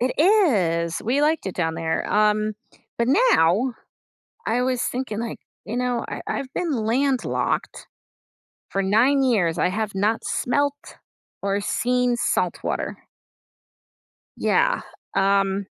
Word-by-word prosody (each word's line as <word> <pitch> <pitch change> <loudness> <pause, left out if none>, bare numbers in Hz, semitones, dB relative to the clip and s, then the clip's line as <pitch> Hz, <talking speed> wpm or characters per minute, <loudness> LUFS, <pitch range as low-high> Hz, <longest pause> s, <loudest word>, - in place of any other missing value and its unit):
It 250 +1 +1
is. 205 - +3
We 260 +6 +1
liked 310 -3 +1
it 190 - -4
down 160 -2 -1
there. 165 0 -2
Um, 215 0 +2 0.5
but 235 +1 +1
now, 255 - +3 0.7
I 245 +2 +1
was 255 -1 0
thinking, 245 -4 -3
like, 230 -1 -5 0.3
you 225 - -5
know, 245 -1 -1
I - - -5
I've 260 -1 -4
been 345 -3 -1
landlocked 255 +3 -1 0.8
for 195 - 0
9 240 +8 +3
years, 200 -11 +2
I - - +2
have 210 +2 -3
not 210 +3 +1
smelt 285 +3 -1 0.4
or 200 0 0
seen 250 +3 +1
saltwater. - - -2 1.4
Yeah, - - +2 0.3
um 195 0 +2
235 Hz, 120 wpm, -23 LUFS, 195-260 Hz, 1.4 s, is